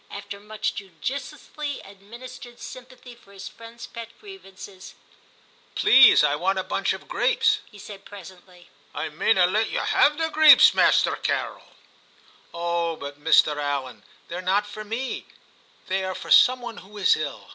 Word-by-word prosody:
After 200 0 -9
much 210 +1 -4
judiciously 275 - -7
administered 235 +5 -13
sympathy 250 -1 -12
for 235 -4 -21
his 195 - -9
friend's 230 0 -12
pet 230 -1 -10
grievances, 195 - -13 0.4
' - - -33
Please, 265 - +6
I 145 -1 +2
want 190 +5 -1
a 190 - -1
bunch - - -2
of - - -10
grapes,' 450 -3 +1
he 210 - -16
said 200 -1 -11
presently. 185 -2 -15
' - - -31
I - - -4
mayna 190 -5 +2
let 215 +5 0
ye - - -3
have 295 0 +2
the 325 0 -1
greeps, 310 -1 +7
Masterrr - - +2
Carrel.' - - -4 0.5
* - - -30
Oh 170 -1 -2
but, 140 -1 -9
M 150 0 +3
'Allan, 140 -3 -4 0.2
they're 175 +1 -6
not 195 +3 0
for 215 +1 -9
me; 230 +5 -5 0.6
they 190 0 -2
are 190 0 -4
for - - -9
some 255 0 +6
one 235 -2 -8
who 205 +3 -13
is 200 - +3
ill. 150 -3 -7
205 Hz, 165 wpm, -23 LUFS, 180-245 Hz, 0.6 s, greeps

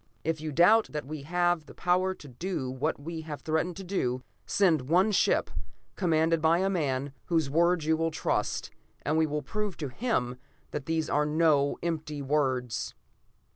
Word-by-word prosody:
If 160 -1 -1
you 155 -1 -3
doubt 195 +9 +5
that 150 -2 -3
we 150 +1 -6
have 175 +1 0
the - - -13
power 185 +1 +1
to 145 - -13
do 135 0 -4
what 140 +5 -1
we 160 +2 -5
have 155 -2 -7
threatened 160 +2 -1
to 195 - -6
do, 130 -10 -1 0.2
send 160 -9 +2
one 185 +6 +4
ship, 200 - +2 0.4
commanded 165 -2 +2
by 160 +1 +4
a 190 +2 +1
man 140 -6 -1
whose 160 -5 +1
word 170 +1 +3
you 160 +1 +3
will 165 +1 0
trust, 155 - -1 0.3
and 150 - 0
we 160 0 +3
will 150 0 -2
prove 210 +6 -3
to 145 -4 -4
him 125 - -1 0.3
that 145 -2 -5
these 160 -1 0
are 150 +1 +1
no 150 -2 +3
empty 155 -3 -3
words.'" 130 -5 0
160 Hz, 175 wpm, -29 LUFS, 145-175 Hz, 0.4 s, doubt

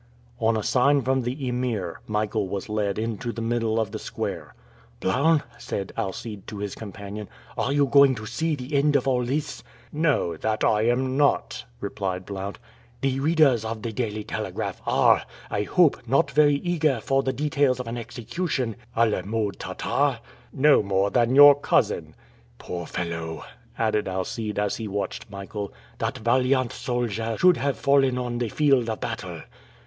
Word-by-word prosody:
On 115 -1 +2
a 110 - -2
sign 140 +2 +3
from 130 0 +1
the 130 +3 -3
Emir, 120 -8 -2
Michael 105 -2 -1
was 100 0 -4
led 105 -2 -1
into 115 +2 -3
the 115 - -7
middle 115 -1 0
of 110 -3 -1
the 110 - -5
square. - - -5 0.4
"Blount," 145 +10 +2 0.2
said 100 -1 -4
Alcide 110 -1 -5
to 105 - -7
his 100 -1 -4
companion, 100 0 -8 0.3
"are 135 - -1
you 145 0 +3
going 140 -1 +6
to 110 -1 -7
see 155 +8 -1
the 130 +1 -8
end 145 +1 +3
of 135 -1 +2
all 125 -2 +2
this?" 140 +5 -2 0.3
"No, 150 - +1
that 110 +5 -1
I 110 +1 +3
am 130 +2 +1
not," 145 -1 +1
replied 95 -2 -3
Blount. 100 0 -5 0.4
"The 135 -1 0
readers 145 -6 +3
of 110 -1 -5
the 115 - -2
Daily 110 -3 -2
Telegraph - - -4
are, - - +4 0.3
I 100 - 0
hope, 165 - +2
not 135 - +2
very 145 +1 +5
eager 155 -4 +1
for 135 +4 +1
the 135 - -1
details 140 -2 +1
of 125 - -4
an 115 +1 -4
execution 120 - -3 0.2
a 115 - +5
la 105 -4 0
mode 105 +1 -2
Tartare?" - - 0 0.3
"No 145 +2 +5
more 100 0 +1
than 120 +1 +2
your 145 0 +10
cousin!" 145 - 0 0.4
"Poor 85 -2 -6
fellow!" 85 -2 -4 0.3
added 110 -2 +1
Alcide, 100 +3 -3
as 105 -1 0
he 110 - -4
watched 100 +2 -4
Michael. 100 0 -6 0.3
"That - - -2
valiant 125 +2 +2
soldier 115 -2 -2
should 180 -1 +5
have 140 0 -1
fallen 135 -2 +3
on 120 -1 -2
the 120 -2 -1
field 135 -3 +2
of 110 - -3
battle!" - - -5
120 Hz, 170 wpm, -25 LUFS, 105-135 Hz, 0.4 s, your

